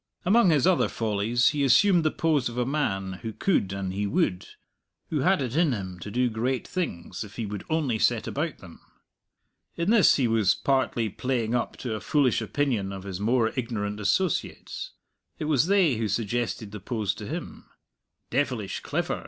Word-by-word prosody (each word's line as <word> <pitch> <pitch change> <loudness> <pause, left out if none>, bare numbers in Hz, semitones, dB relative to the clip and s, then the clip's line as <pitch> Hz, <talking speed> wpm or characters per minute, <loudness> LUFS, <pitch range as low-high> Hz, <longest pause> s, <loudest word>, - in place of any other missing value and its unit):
Among 200 +1 +5
his 150 -5 +3
other 185 -2 +3
follies, 115 +3 +1
he 145 -2 -1
assumed 170 +7 +5
the 155 - +3
pose 150 -6 +1
of 120 - -8
a 125 - +1
man 95 -10 -2
who 115 - -4
could 110 - 0
an 100 -1 -3
he 100 +2 -2
would 100 - 0 0.6
who 155 - 0
had 180 +2 +2
it 125 0 -4
in 160 -4 +3
him 95 -4 -5
to 100 - -7
do 125 +4 +1
great 120 +3 -2
things, 100 - -4
if 100 -2 -12
he 115 - -3
would 105 -1 -5
only 145 -8 0
set 120 -1 +2
about 155 0 -3
them. 85 -4 -14 1.0
In 170 +5 +1
this 225 -4 +6
he 130 -4 +2
was 110 -4 +3
partly 130 -4 0
playing 115 +2 -2
up 120 - -1
to 120 -4 -4
a 110 - -3
foolish 135 -3 +2
opinion 110 -3 -1
of 95 -1 -7
his 95 -2 -6
more 115 +1 +2
ignorant 105 -4 -3
associates; 145 - -1 0.4
it - - -4
was 150 0 +2
they 185 - +3
who 110 -1 -1
suggested 110 0 -2
the 105 - -7
pose 105 0 -2
to 105 -1 -8
him. - - -6 0.7
"Devilish 125 -6 -1
clever!" - - -2
120 Hz, 185 wpm, -26 LUFS, 105-145 Hz, 1.0 s, this